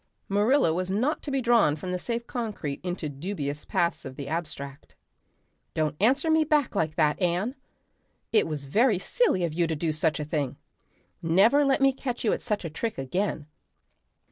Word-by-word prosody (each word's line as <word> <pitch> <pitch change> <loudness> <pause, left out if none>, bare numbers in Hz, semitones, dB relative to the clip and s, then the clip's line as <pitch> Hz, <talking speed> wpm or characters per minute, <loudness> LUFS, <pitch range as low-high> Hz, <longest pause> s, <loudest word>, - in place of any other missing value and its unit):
Marilla 205 - +3
was 185 +2 -2
not 245 +11 0
to - - -6
be 270 -1 0
drawn 230 -11 +4
from 180 +4 -5
the 180 - -2
safe 235 +4 -3
concrete 210 - -4
into 180 -3 -3
dubious 145 -1 -4
paths 170 -1 0
of 130 -1 -8
the 140 0 -6
abstract. 145 -3 -5 0.8
"Don't 155 -1 0
answer 270 - +3
me 315 0 +4
back 300 -3 +1
like 160 -6 0
that, 150 +2 +2
Anne. 180 +7 +1 0.8
It 215 - +4
was 150 -3 -3
very 215 - +3
silly 190 - +1
of 165 -3 -1
you 170 +1 +1
to 160 - -1
do 160 +1 -1
such 155 +1 +1
a 150 - -3
thing. 145 -4 -2 0.6
Never 200 - +4
let 275 0 +2
me 270 0 +5
catch 255 -2 -4
you 215 - +3
at - - -3
such 210 -6 -2
a - - -3
trick 225 +8 -3
again. 150 +4 -2
180 Hz, 185 wpm, -27 LUFS, 155-235 Hz, 0.8 s, me